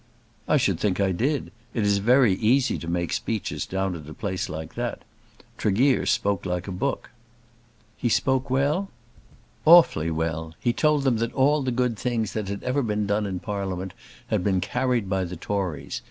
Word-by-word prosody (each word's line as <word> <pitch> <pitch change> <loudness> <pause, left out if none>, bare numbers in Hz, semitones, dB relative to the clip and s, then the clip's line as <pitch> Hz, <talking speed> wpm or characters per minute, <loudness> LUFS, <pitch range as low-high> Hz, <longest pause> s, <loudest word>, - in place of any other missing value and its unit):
"I - - +4
should - - +1
think 100 -3 0
I 100 -1 +2
did. 135 - -1 0.2
It 115 - +1
is 100 -1 +2
very 120 0 +4
easy 125 +7 +2
to 85 - -8
make 85 0 -1
speeches 110 -3 -3
down 95 0 -1
at 75 -3 -8
a 75 - -9
place 95 -3 -3
like 80 0 -6
that. - - -4 0.6
Tregear 125 +7 +2
spoke 100 -3 +1
like 90 0 -3
a - - -4
book." 115 +10 -3 0.9
"He 120 - 0
spoke 130 +3 +1
well?" 145 +9 +1 0.7
"Awfully 160 - +6
well. 80 0 -3
He 120 - +1
told 150 +1 +2
them 130 -4 +2
that 115 +1 -2
all 145 +3 +3
the 130 -1 -1
good 125 -2 0
things 115 -5 -1
that 110 -3 -3
had 100 0 -5
ever 130 +3 0
been 105 -3 -1
done 105 +1 0
in 95 -2 -4
Parliament 95 -3 -4 0.4
had - - 0
been 95 -1 +2
carried 120 +3 0
by 95 0 0
the 90 0 -5
Tories. 95 -3 -3
105 Hz, 185 wpm, -25 LUFS, 95-125 Hz, 0.9 s, Awfully